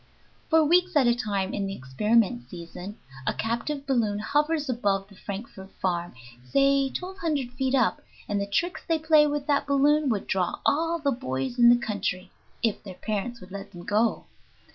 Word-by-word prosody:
For 320 -1 +5
weeks 360 +3 +3
at 285 -4 +5
a 240 - +5
time 200 -5 -2
in 200 -1 -1
the 195 - -4
experiment 130 - +1
season 180 +5 -8 0.3
a - - +1
captive 240 +6 -2
balloon 230 -7 +1
hovers 295 +6 0
above 200 -6 0
the 200 - -16
Frankfort 195 0 -8
farm, 175 -6 -1 0.3
say 275 - +3
twelve 375 +6 -6
hundred 290 -7 -1
feet 260 +1 0
up, 255 -4 +2 0.3
and 205 -1 -1
the 200 - -2
tricks 345 - -1
they 330 - +3
play 310 -1 +5
with 290 -1 -2
that 290 -1 +1
balloon 285 +1 +3
would 210 -4 -1
draw 185 -2 0
all 330 +3 +2
the 290 -3 0
boys 135 - -3
in 235 0 +8
the 240 - +7
country, 200 -5 -3 0.3
if 225 -3 +1
their 190 -3 -9
parents 215 +4 -3
would 185 +1 -13
let 200 +1 -8
them 175 -1 -9
go. 215 +2 +1
235 Hz, 185 wpm, -26 LUFS, 195-285 Hz, 0.3 s, in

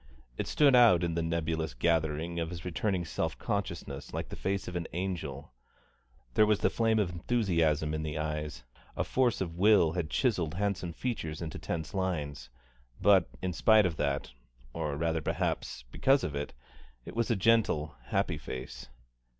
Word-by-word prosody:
It - - -3
stood 140 -3 +5
out 115 -8 +6
in 85 -1 0
the 85 - 0
nebulous 80 -3 -1
gathering 80 +3 0
of 80 -1 -2
his 85 -1 -7
returning 90 +1 -1
self - - -2
consciousness 70 0 -4
like - - -4
the - - -6
face 100 +1 -2
of 90 - -6
an 85 -2 -2
angel; 80 -7 -4 0.8
there 105 - +5
was 105 -2 +2
the - - +3
flame 115 -1 +2
of 100 -5 +1
enthusiasm 85 -6 +1
in 75 - -2
the 80 0 -3
eyes, 75 -4 -3 0.3
a - - +1
force 125 -5 +1
of 85 -2 -4
will 100 -5 +5
had 85 -2 -2
chiselled 90 - 0
handsome 100 -3 -1
features 85 -7 -3
into 80 -2 -5
tense 80 -2 -4
lines; 80 -9 -2 0.5
but 100 -2 +5
in 90 -1 -1
spite 110 +4 +5
of 85 -4 -1
that, 70 -3 -1 0.4
or 70 -2 -2
rather 80 0 0
perhaps 65 - -2
because 135 - +3
of 75 - -2
it, 70 -2 -4 0.5
it - - -9
was 115 0 0
a 115 - +3
gentle, 95 -8 +2
happy - - 0
face. - - -7
85 Hz, 170 wpm, -30 LUFS, 75-100 Hz, 0.8 s, out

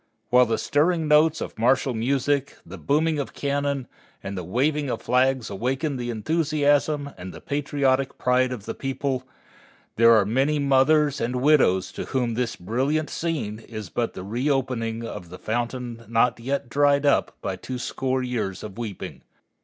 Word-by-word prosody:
While 125 0 +6
the 115 - 0
stirring 160 +2 +1
notes 155 +2 +4
of - - -6
martial 130 +2 +2
music, 135 +4 0
the - - -10
booming 155 +2 +1
of 130 -7 -5
cannon, 140 -2 -1 0.4
and 100 - -5
the 90 - -4
waving 140 - 0
of - - -3
flags 130 -2 +1
awaken 130 +8 -1
the 120 -1 -4
enthusiasm 145 +3 +1
and 90 +1 -7
the - - -10
patriotic 140 -2 0
pride 125 0 +2
of 115 -5 -6
the - - -4
people, 135 -1 -3 0.7
there 115 +1 +7
are 105 -3 +4
many 135 +8 +1
mothers 145 +1 +3
and 120 +2 -1
widows 125 -10 +3
to - - -6
whom 125 -3 -1
this 120 0 -1
brilliant 135 - -1
scene 130 -11 -3
is 110 -4 -8
but 120 - -2
the 95 - -6
reopening 120 0 -1
of 90 -6 -7
the 90 - -9
fountain 120 +3 -3
not 115 +1 +2
yet 135 +2 -2
dried 140 +3 +3
up 140 - +2
by 95 - -3
twoscore 130 +4 -3
years 110 -7 -3
of 105 +1 -8
weeping. 110 -5 -6
130 Hz, 160 wpm, -24 LUFS, 115-145 Hz, 0.7 s, there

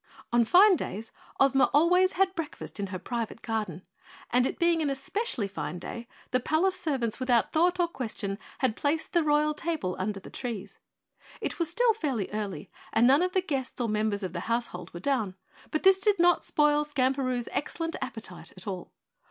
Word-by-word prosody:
On 240 0 +5
fine 375 - +7
days 220 -3 -5 0.3
Ozma 270 -1 +4
always 360 +5 +5
had 380 0 +2
breakfast 330 - -6
in 200 - -2
her 185 0 -5
private 230 +2 -4
garden, 210 -6 -3 0.5
and 250 +1 +4
it - - -4
being 340 -1 +3
an 295 - +1
especially 275 - -2
fine 195 -2 -5
day, 235 +6 -7 0.2
the 255 - +3
palace 325 +8 +1
servants 275 - -1
without 245 -3 +2
thought 355 +3 +3
or 350 - +3
question 220 -9 -4 0.2
had 255 -5 +2
placed 305 +3 -1
the 345 - +4
royal 300 0 +2
table 300 - -2
under 195 +1 -2
the - - -12
trees. 205 -6 -6 0.6
It - - -4
was 335 - 0
still 485 -2 +3
fairly 270 - -2
early 200 -7 -4 0.2
and 230 - +4
none 275 +5 +6
of 365 0 0
the 375 - +3
guests 275 -9 -3
or 240 - 0
members 210 -1 0
of 180 -3 -4
the 170 - -3
household 230 -6 -2
were 175 - -7
down, 220 -4 0 0.3
but 310 - -2
this 385 0 +6
did 410 +1 +3
not 350 0 +4
spoil 295 0 +3
Skamperoo's 260 -4 0
excellent 330 +3 -2
appetite - - -6
at - - -11
all. 185 -4 -5
265 Hz, 185 wpm, -28 LUFS, 220-335 Hz, 0.6 s, fine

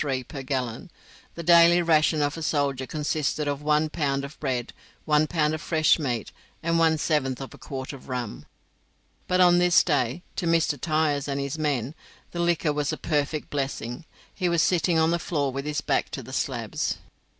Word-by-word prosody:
per 140 - -7
gallon. 130 - -3 0.5
The 170 - -6
daily 170 +1 +7
ration 155 -2 +3
of 145 0 -1
a 165 - -6
soldier 140 -4 0
consisted 150 -1 -1
of 145 0 -2
one 150 +1 +2
pound 140 -3 -1
of 140 - -12
bread, 125 -4 -2 0.3
one 150 0 +3
pound 155 -2 +1
of 155 - -4
fresh 160 0 +3
meat, 120 -7 -2 0.3
and 165 0 +1
one 160 -1 +4
seventh 150 -5 0
of 135 -4 -7
a - - -14
quart 130 0 -6
of 135 0 -12
rum. 125 -4 -5 0.8
But 185 0 +2
on 175 -1 +6
this 180 0 +5
day, 145 0 0
to 180 -3 -1
Mr. 165 -4 +1
Tyers 155 -3 +1
and 140 -1 -2
his 140 +3 -3
men, 140 -3 -1 0.4
the 175 - -5
liquor 170 -3 +1
was 145 0 -1
a 155 - -3
perfect 150 -1 -2
blessing. 135 -1 -3 0.3
He 180 -3 -1
was 170 -1 +3
sitting 175 -1 +2
on 160 +1 +3
the 170 - +1
floor 145 -5 -1
with 135 +2 -4
his 150 -2 -2
back - - 0
to - - -5
the - - -10
slabs. - - -2
150 Hz, 190 wpm, -26 LUFS, 140-165 Hz, 0.8 s, daily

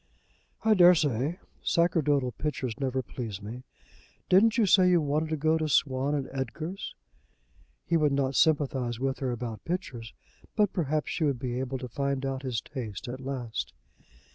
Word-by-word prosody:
"I 220 -1 +5
dare 180 -2 +8
say. 145 +1 0 0.2
Sacerdotal 150 -6 +2
pictures 130 -4 -3
never 130 -1 -1
please 110 -5 -6
me. 115 +5 -8 0.6
Didn't 220 +5 +5
you 225 - +4
say 185 -1 +6
you 175 -1 +5
wanted 155 +1 0
to 155 - -1
go 160 +2 +2
to 155 -1 -1
Swann 135 0 +2
and 140 -2 -2
Edgar's?" 155 +8 -5 0.9
He 170 - +2
would 150 -2 +3
not 140 -1 +1
sympathize 135 -6 +2
with 135 +1 -1
her 130 - -1
about 115 -3 -5
pictures, 135 -11 -4 0.4
but 210 -3 +2
perhaps 155 -4 -1
she 165 - -1
would 140 -4 +1
be 125 0 -3
able 130 0 -2
to 125 - -6
find 140 +2 -2
out 135 -1 -2
his 125 -5 -2
taste 120 -5 -6
at 130 +2 -6
last. 130 -4 -4
140 Hz, 165 wpm, -28 LUFS, 125-160 Hz, 0.9 s, dare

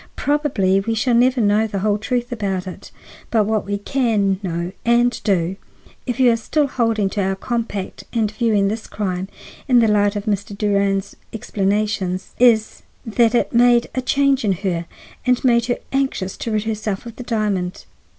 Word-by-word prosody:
Probably 255 -11 +1
we 225 +3 -2
shall 240 +3 +1
never 250 +2 +3
know 215 0 +3
the 200 - -4
whole 205 +1 +1
truth 245 +2 -2
about 195 -5 -2
it; 185 - -9 0.4
but 220 -2 +3
what 215 -1 -1
we 205 0 -1
can 205 -4 0
know 170 -2 -3
and 240 +1 +2
do, 185 -2 0 0.5
if 245 +1 -2
you 250 -2 +6
are - - +3
still 290 +6 0
holding 230 -6 0
to 205 - -1
our 195 0 0
compact 225 -2 -4
and 220 -3 0
viewing 215 -2 +1
this 215 +2 -4
crime 190 -3 -3 0.4
in 255 -3 +4
the 230 -2 +5
light 205 -1 +2
of 205 0 -4
Mr. 205 -1 -2
Durand's 200 -1 0 0.2
explanations, 200 -3 -1
is 230 -3 +3 0.2
that 230 +1 +2
it - - +1
made 240 0 +4
a 255 - -1
change 275 0 +2
in 200 -3 +2
her 170 -3 -1 0.4
and 250 -1 +1
made 235 -2 +3
her 245 - 0
anxious 265 -9 -1
to - - -4
rid 215 -1 0
herself 215 -2 -3
of 235 0 -9
the 250 - -6
diamond. 210 -6 -2
215 Hz, 180 wpm, -20 LUFS, 200-240 Hz, 0.5 s, you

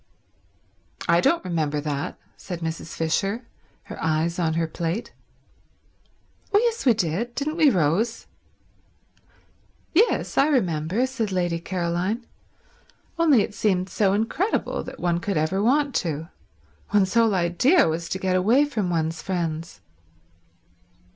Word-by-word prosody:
"I 170 +1 +4
don't 335 - +2
remember 155 -4 -1
that," 145 -1 -3 0.2
said 175 -2 -7
Mrs. 165 0 -5
Fisher, 195 +8 -1 0.4
her - - -9
eyes 160 +2 0
on 160 -2 +1
her 165 0 +1
plate. 170 +6 -4 1.4
"Oh 405 - +5
yes, 460 - +1
we 240 - +6
did—didn't 235 - -2
we, 310 -4 +6
Rose?" 190 - +1 1.7
"Yes—I 340 - +3
remember," 185 - +1
said 235 -6 -3
Lady 175 -2 0
Caroline. 180 +6 -2 0.9
"Only 295 -10 +5
it - - -6
seemed 190 -3 0
so 195 -1 +2
incredible 230 - -1
that - - -9
one 175 -1 0
could 195 -1 -2
ever 160 +6 0
want 280 +5 +2
to. 160 -1 -3 0.6
One's 195 -2 +2
whole 225 -3 +4
idea 190 - +3
was 165 +1 -2
to - - -2
get 190 -1 0
away 225 +10 +4
from 220 -10 -2
one's 160 -1 -1
friends." 165 -3 -3
185 Hz, 125 wpm, -24 LUFS, 165-235 Hz, 1.7 s, we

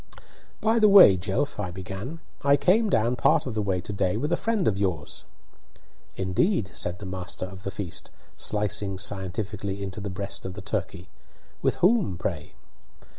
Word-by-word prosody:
"By 225 +1 +3
the 215 -1 +6
way, 190 - +9
Jelf," 100 +9 -2
I 100 -3 -2
began, 95 - -7 0.2
"I 140 0 +5
came 210 +7 +3
down 115 - +2
part 155 +4 +3
of 125 - -4
the 110 - -1
way 95 -3 0
to 100 - -6
day 95 0 0
with 150 +7 -2
a - - +4
friend 215 -1 0
of 100 -2 +1
yours." 90 -7 -3 0.9
"Indeed!" 95 - 0
said 90 0 -1
the 105 - -9
master 95 0 -5
of 95 0 -10
the 100 - -4
feast, 95 -4 -4 0.3
slicing 105 -2 0
scientifically 100 0 -3
into 95 +2 -5
the 100 - -4
breast 100 +2 -4
of 95 -1 -6
the 105 - -7
turkey. 95 -3 -4 0.5
"With - - +1
whom, 185 - +2
pray?" 80 -3 -4
100 Hz, 175 wpm, -26 LUFS, 95-140 Hz, 0.9 s, way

